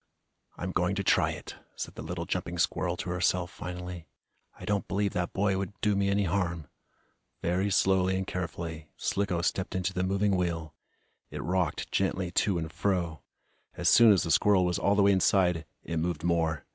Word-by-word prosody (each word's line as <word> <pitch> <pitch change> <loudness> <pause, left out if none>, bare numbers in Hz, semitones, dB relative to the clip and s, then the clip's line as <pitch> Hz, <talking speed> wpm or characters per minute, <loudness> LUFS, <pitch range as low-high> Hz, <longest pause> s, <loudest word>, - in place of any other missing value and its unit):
"I'm 90 +1 -3
going 90 +2 +1
to 100 - -1
try - - +3
it!" - - -7 0.2
said - - -5
the - - -8
little 85 +2 -4
jumping 90 -1 -3
squirrel - - 0
to 90 - -4
herself, 90 0 0
finally. 90 -1 -7 0.5
"I - - -8
don't 100 -1 -1
believe 100 0 0
that 90 -1 -1
boy 95 -1 +1
would 100 0 -5
do 105 -1 +2
me 100 0 +1
any 100 +1 +2
harm." 85 -4 -1 0.7
Very 90 +4 +1
slowly 95 -1 +3
and 95 - -2
carefully, 85 -4 -5
Slicko 90 -4 -1
stepped 95 0 -1
into 95 +1 -1
the 90 - -1
moving 100 +1 +1
wheel. 85 -3 -2 0.6
It - - -6
rocked 90 -3 -1
gently 95 -2 0
to 95 0 +1
and 80 -1 -4
fro. 85 -7 -1 0.5
As - - +2
soon 115 -2 +8
as 95 - +4
the 80 - -2
squirrel 95 +3 +4
was 90 -1 0
all 100 - +2
the 100 - +4
way 100 - +6
inside, 90 -3 +3 0.2
it 85 - -4
moved 80 -2 -2
more. 80 -3 0
90 Hz, 185 wpm, -29 LUFS, 85-95 Hz, 0.7 s, soon